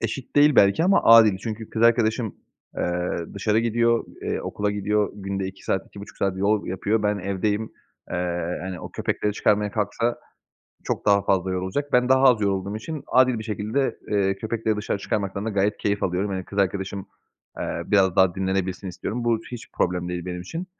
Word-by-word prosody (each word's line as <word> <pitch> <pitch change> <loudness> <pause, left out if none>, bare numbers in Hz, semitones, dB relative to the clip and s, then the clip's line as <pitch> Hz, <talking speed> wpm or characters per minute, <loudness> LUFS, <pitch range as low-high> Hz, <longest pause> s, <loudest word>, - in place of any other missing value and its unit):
eşit 120 +5 -5
değil 145 0 +6
belki 100 +12 +5
ama 195 +2 +4
adil. 115 -4 +7
Çünkü 110 +1 -6
kız 110 - -2
arkadaşım, 115 -1 +2 0.4
eee, 90 0 -1 0.2
dışarı 105 +2 +1
gidiyor, 115 0 +2 0.2
eee, - - -2
okula 105 0 -2
gidiyor, 105 0 0
günde 95 -1 -4
2 95 0 -10
saat, 95 - -1
2,5 100 0 -12
saat 95 -1 -1
yol 105 +2 +1
yapıyor. 105 +4 -1
Ben 105 0 +1
evdeyim, 105 +3 -2 0.4
eee, 90 0 -2
hani, 95 -2 -5
o - - -8
köpekleri 105 - -1
çıkarmaya 105 0 +1
kalksa 115 +3 -1 0.7
çok - - -3
daha 100 -1 +5
fazla 95 -1 +1
yorulacak. 95 +11 -3
Ben 125 0 +3
daha 130 0 +4
az 125 -4 +6
yorulduğum 100 0 -1
için 150 +6 -6
adil 130 -2 +3
bir 110 - -6
şekilde, 110 +5 -1
eee, 95 -2 +1
köpekleri 110 0 -2
dışarı 105 -1 -2
çıkarmaktan 100 0 -2
da 110 - -1
gayet 100 0 +1
keyif 100 -1 -1
alıyorum. 95 +3 0
Hani, 95 -1 -3
kız 100 - -8
arkadaşım, 95 0 -1 0.5
eee, - - -3
biraz 95 -3 +3
daha 95 -2 +4
dinlenebilsin 95 0 -2
istiyorum. 115 +6 -4
Bu 115 -1 +2
hiç 120 -2 -8
problem 90 0 -1
değil 90 -1 -4
benim 90 -1 -5
için, 165 - -6
105 Hz, 180 wpm, -24 LUFS, 95-115 Hz, 0.7 s, adil